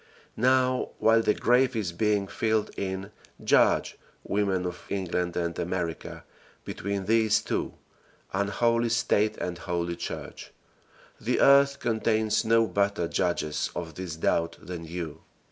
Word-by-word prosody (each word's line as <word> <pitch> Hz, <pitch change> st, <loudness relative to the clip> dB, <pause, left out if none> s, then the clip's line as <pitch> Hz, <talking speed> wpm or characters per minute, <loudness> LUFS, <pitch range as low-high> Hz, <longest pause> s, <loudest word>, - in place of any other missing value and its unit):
Now 130 Hz, +1 st, +2 dB
while 115 Hz, +1 st, +4 dB
the 105 Hz, -, +2 dB
grave 125 Hz, +1 st, +3 dB
is 105 Hz, -6 st, -1 dB
being 105 Hz, +2 st, +1 dB
filled 110 Hz, +1 st, -1 dB
in, 95 Hz, +1 st, -4 dB, 0.3 s
judge, -, -, +3 dB, 0.2 s
women 100 Hz, -3 st, 0 dB
of 90 Hz, 0 st, -5 dB
England 90 Hz, -2 st, -2 dB
and 85 Hz, -1 st, -2 dB
America, 85 Hz, -2 st, -4 dB, 0.4 s
between 100 Hz, +1 st, -3 dB
these 110 Hz, 0 st, +3 dB
two -, -, -2 dB, 0.6 s
unholy 115 Hz, +4 st, +1 dB
State 110 Hz, -2 st, +1 dB
and 90 Hz, -1 st, -4 dB
holy 85 Hz, -2 st, -2 dB
Church. 85 Hz, -, -7 dB, 0.7 s
The -, -, 0 dB
earth 140 Hz, 0 st, +6 dB
contains 110 Hz, -1 st, +1 dB
no 115 Hz, 0 st, +4 dB
better 100 Hz, -4 st, 0 dB
judges 85 Hz, -4 st, -1 dB
of 80 Hz, -2 st, -5 dB
this 90 Hz, -1 st, -6 dB
doubt 85 Hz, +1 st, 0 dB
than 85 Hz, -1 st, -7 dB
you. 80 Hz, -2 st, -6 dB
100 Hz, 130 wpm, -27 LUFS, 85-115 Hz, 0.7 s, earth